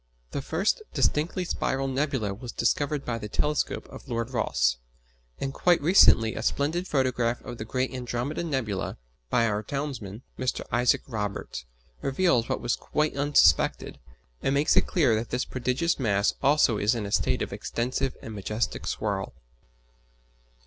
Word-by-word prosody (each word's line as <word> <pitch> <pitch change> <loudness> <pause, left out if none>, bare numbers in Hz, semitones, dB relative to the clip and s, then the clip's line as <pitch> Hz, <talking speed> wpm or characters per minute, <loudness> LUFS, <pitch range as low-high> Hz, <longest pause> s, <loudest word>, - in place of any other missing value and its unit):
The 140 - -3
first 175 - 0
distinctly 170 +4 +1
spiral 135 -5 -1
nebula 135 -6 -1
was 120 +4 -7
discovered 145 +4 0
by 115 -1 -2
the 105 - -6
telescope 150 +7 -1
of - - -11
Lord 115 +1 -2
Rosse; - - +1 0.6
and 135 0 -3
quite 175 +3 +3
recently 140 - +6
a - - -4
splendid 165 +6 0
photograph 125 -4 +1
of 120 -2 -8
the 110 - -4
great 130 +3 -1
Andromeda 125 +5 -3
nebula, 125 - -2 0.3
by 115 - +3
our 105 -2 0
townsman, 120 -4 -5 0.2
Mr. 130 0 -1
Isaac 120 +1 +3
Roberts, 105 - -4 0.4
reveals 135 -4 +2
what - - -1
was 120 0 0
quite 150 -1 -1
unsuspected 145 +1 +3 0.4
and 135 - +1
makes 145 +3 +3
it - - +4
clear 150 -10 +3
that 110 +2 -1
this 125 +1 -1
prodigious 130 +7 -1
mass 100 -5 +2
also 135 -6 +4
is 105 +4 +2
in 110 -3 -3
a 100 - -5
state - - +1
of - - -5
extensive 130 +3 -2
and 115 - -7
majestic 105 +2 -3
whirl. - - -2
125 Hz, 155 wpm, -27 LUFS, 115-145 Hz, 0.6 s, recently